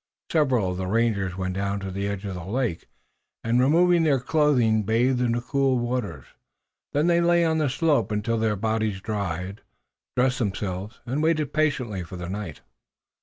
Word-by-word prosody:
Several 130 - +2
of 90 - -4
the 95 0 -3
rangers 100 -4 0
went 95 -1 -2
down 100 +1 -2
to 95 -1 -5
the 100 +2 -2
edge 100 0 -4
of 100 - -4
the 90 -1 -6
lake, 110 -2 -2 0.6
and, 115 +2 +2
removing 170 +6 +4
their 145 -4 +3
clothing, 125 -6 +2
bathed 120 +4 +1
in 120 -2 +2
the 120 - -1
cool 135 0 +1
waters. 120 - -3 0.7
Then 145 +2 +1
they 170 0 +3
lay 170 0 +4
on 160 -1 +1
the 150 -3 +1
slope 145 -1 +1
until 105 +2 0
their 110 -1 +1
bodies 110 -1 -1
dried, 95 -2 -4 0.6
dressed 125 +1 +2
themselves, 100 -1 -3
and 135 +4 -1
waited 155 -3 +1
patiently 125 -10 0
for 90 +1 -8
the 90 -1 -6
night. 95 -5 -6
115 Hz, 175 wpm, -25 LUFS, 100-135 Hz, 0.7 s, removing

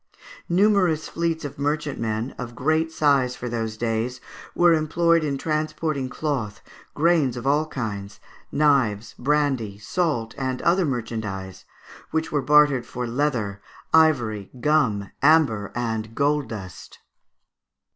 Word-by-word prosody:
Numerous 180 -4 +3
fleets 165 -2 -2
of 145 - -7
merchantmen, 140 -6 -2
of 120 -1 -6
great 155 +5 +1
size 140 -5 +2
for 125 - -6
those 115 -2 -3
days, 115 +2 -2 0.4
were 175 -1 +5
employed 165 +1 +2
in 140 -2 -1
transporting 155 -2 -2
cloth, 130 -9 -3 0.4
grain 155 -6 +2
of 125 - -6
all 150 +3 +2
kinds, 105 -6 -5 0.3
knives, 125 -8 +2
brandy, 135 -7 0
salt, 115 - -1
and 130 -1 -2
other 175 +2 +3
merchandise, 110 -7 -4 0.4
which 160 0 -2
were 145 - +1
bartered 145 -3 +4
for 125 0 -4
leather, 115 -6 -1 0.3
ivory, 120 -11 +3
gum, 120 -9 +1
amber, 140 -9 +3
and 115 -2 -3
gold 145 0 +1
dust. 95 -5 -9
135 Hz, 120 wpm, -24 LUFS, 115-155 Hz, 0.4 s, were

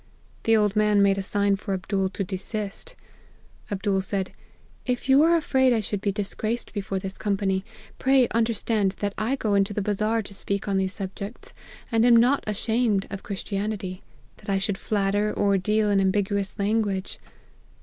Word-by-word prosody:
The 225 0 +5
old 210 -1 +2
man 210 -1 +4
made 195 0 +3
a - - 0
sign 200 +1 +1
for 195 -1 -3
Abdool 190 +1 -1
to 195 - -3
desist. 205 - -4 0.8
Abdool 195 -1 0
said, 190 0 -2
4 - - -25 0.5
If 250 +1 -1
you 270 +1 +6
are 335 +2 +5
afraid 260 -5 +3
1 220 -2 0
should 205 0 -3
be 200 - +1
disgraced 215 +3 -3
before 195 -2 -3
this 190 0 -5
company, 195 -2 0 0.4
pray 265 -2 +4
understand 225 -3 +1
that 205 -1 -2
I 225 +5 0
go 220 -6 -1
into 200 0 +2
the 210 - 0
Bazar 215 +2 0
to 200 - -10
speak 200 +1 -3
on 195 -1 +1
these 190 0 0
subjects, 200 +2 -7 0.4
and 225 -1 +3
am 240 -1 +6
not 245 +5 +4
ashamed 215 -1 +1
of 200 -1 -5
Christianity, 200 -1 -4 0.4
that - - -11
I 195 - +2
should 195 0 -1
flatter, 205 0 0
or 200 -2 +2
deal 210 +2 +1
in 195 -1 +3
ambiguous 200 0 0
language.' 200 -2 -1
205 Hz, 175 wpm, -25 LUFS, 195-220 Hz, 0.8 s, you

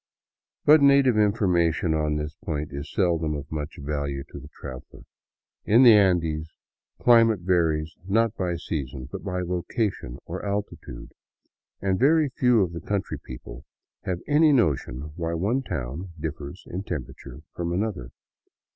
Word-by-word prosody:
But 150 0 +7
native 140 -3 +5
information 90 -6 +2
on 75 -1 0
this 75 0 -3
point 75 -5 -4
is 70 +2 -6
seldom 85 -6 +1
of 70 0 -7
much 75 -1 -5
value 70 -1 -3
to - - -8
the 70 - -12
traveler. 65 -3 -10 0.6
In 115 +5 +5
the 120 -3 +9
Andes, 85 -6 +2 0.5
climate 115 -4 +5
varies 80 -3 +1
not 115 +2 +2
by 90 -4 -1
season 70 -5 -5
but - - -6
by 90 -2 -2
location 90 - -2
or - - -6
altitude, 100 -11 -5 0.7
and 95 -1 +1
very 150 +3 +4
few 125 -4 +3
of 85 -2 -4
the 85 - -6
country 100 +1 -3
people 65 -1 -10 0.4
have 90 -2 -3
any 150 +1 +5
notion 75 - 0
why 85 -1 -2
one 105 +11 0
town 85 - -5
differs 80 +2 -6
in 90 - -5
temperature 65 -9 -7
from 85 -1 -3
another. 90 - -2
85 Hz, 145 wpm, -25 LUFS, 75-105 Hz, 0.7 s, the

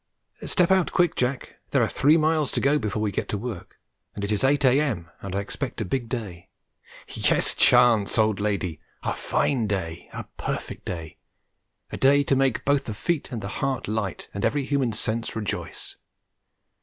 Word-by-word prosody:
Step 180 -2 +3
out 190 -2 +3
quick, 175 -2 +2
Jack; 125 +1 -2
there - - +3
are - - +2
three 150 +4 +4
miles 155 -2 +2
to - - -1
go 145 +2 +3
before 105 -2 -2
we 105 - 0
get - - -3
to 105 - -1
work, 105 -4 -7 0.4
and 100 - -5
it 100 - -2
is 105 +2 0
8 140 +1 +3
a.m. 125 - +2
and 95 -1 -5
I 100 - +1
expect 100 - -5
a - - -1
big 120 +4 -2
day. 105 -9 -5 0.6
Yes, - - +2
Chance, 120 -5 +4
old 110 -2 +3
lady, 100 -6 -1 0.2
a - - 0
fine 120 -6 0
day 90 -5 -3
a - - -6
perfect - - -4
day 85 -3 -6 0.7
a - - -4
day 140 +2 +5
to 140 - +2
make 135 -2 +1
both 140 0 +2
the 110 - -5
feet 160 - -2
and 115 -4 -4
the - - -3
heart 135 -1 -1
light 105 -3 -3
and 100 - -4
every 145 -2 +1
human 135 -4 +1
sense 110 +1 -2
rejoice. 105 -3 -5
115 Hz, 185 wpm, -25 LUFS, 100-140 Hz, 0.7 s, day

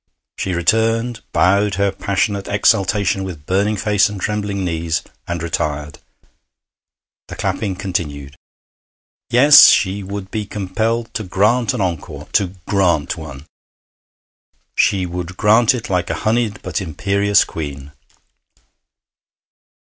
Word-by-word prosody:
She 95 -2 -3
returned, 115 +6 +1
bowed 100 +2 +2
her 100 +1 +1
passionate 100 +1 -2
exultation 100 -1 +1
with 85 -6 -8
burning 100 +4 0
face 105 0 +2
and 105 -2 -7
trembling 100 -1 -2
knees, 80 -1 -2 0.2
and 85 -1 -3
retired. 75 -3 -3 1.3
The - - -8
clapping 100 -3 -2
continued. 75 -8 -4 0.9
Yes, 140 +4 +8
she 100 0 +3
would 100 0 -7
be 105 -2 -3
compelled 110 +4 -2
to 110 - -3
grant 110 +7 +1
an 120 - -2
encore 85 -5 -4
to 95 -2 0
grant 90 -7 +1
one. 70 +1 -10 1.3
She 95 -3 +2
would 90 +1 -6
grant 110 +3 +4
it 115 - -5
like 90 -3 -1
a 80 - -1
honeyed 110 -2 0
but - - -3
imperious 100 +4 +1
queen. 70 -3 -7
100 Hz, 120 wpm, -18 LUFS, 90-105 Hz, 1.3 s, Yes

